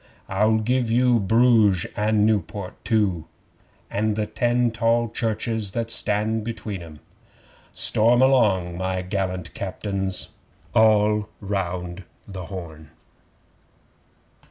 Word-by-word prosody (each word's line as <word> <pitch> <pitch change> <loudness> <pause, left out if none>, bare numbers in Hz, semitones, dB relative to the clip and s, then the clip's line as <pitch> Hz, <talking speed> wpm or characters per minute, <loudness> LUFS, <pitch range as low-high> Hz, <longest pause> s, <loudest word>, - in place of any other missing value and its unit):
I'll 105 +3 +2
give 120 +2 0
you 120 0 +3
Bruges 110 -3 +3
and 105 0 +2
Niewport 105 -3 -1
too, 100 -8 0 0.7
And 105 +1 0
the 105 0 -1
ten 120 +2 +1
tall 115 +1 +1
churches 110 -2 -2
that 115 -1 -2
stand 110 +1 0
between 110 -4 -5
'em.' 80 -3 -12 0.7
Storm 115 +3 +3
along, 105 -10 +3
my 95 0 -2
gallant 95 -2 -3
Captains! 95 -1 -3 0.4
(All 105 -1 +3
round 90 -2 -4 0.2
the 95 -3 -7
Horn!) 80 -4 -9
105 Hz, 105 wpm, -23 LUFS, 95-115 Hz, 0.7 s, you